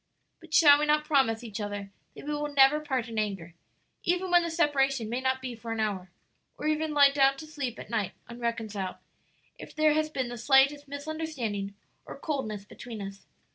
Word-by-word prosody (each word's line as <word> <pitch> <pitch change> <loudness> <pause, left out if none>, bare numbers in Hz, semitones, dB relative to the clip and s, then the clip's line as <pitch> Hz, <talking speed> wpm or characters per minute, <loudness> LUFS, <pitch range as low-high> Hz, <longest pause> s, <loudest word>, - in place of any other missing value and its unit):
"But 330 -2 -16
shall 290 -3 +8
we 300 - +1
not 300 0 +3
promise 265 -6 +2
each 220 -2 -6
other 205 -1 -5 0.2
that - - -10
we 300 - -2
will 295 0 -2
never 280 +1 +5
part 265 -6 -2
in 225 -1 -3
anger, 195 -6 -3 0.5
even 360 +1 0
when 350 0 +6
the 340 - -2
separation 275 -7 +1
may 245 +2 -1
not 260 0 0
be 255 -2 -4
for 230 0 -7
an 225 - -3
hour? 200 -4 -2 0.5
or - - -6
ever 310 +1 +1
lie 290 -2 +5
down 275 -1 +3
to 310 - -8
sleep 285 -6 -5
at - - -10
night 210 -4 -1
unreconciled, 225 -5 -4 0.6
if - - -11
there 310 -1 +4
has 310 0 +1
been 260 -5 -3
the 240 -1 -7
slightest 275 +4 +4
misunderstanding 285 -9 -4 0.3
or - - -9
coldness 220 -10 -3
between 225 +1 -9
us?" 195 0 -8
270 Hz, 195 wpm, -28 LUFS, 220-300 Hz, 0.6 s, shall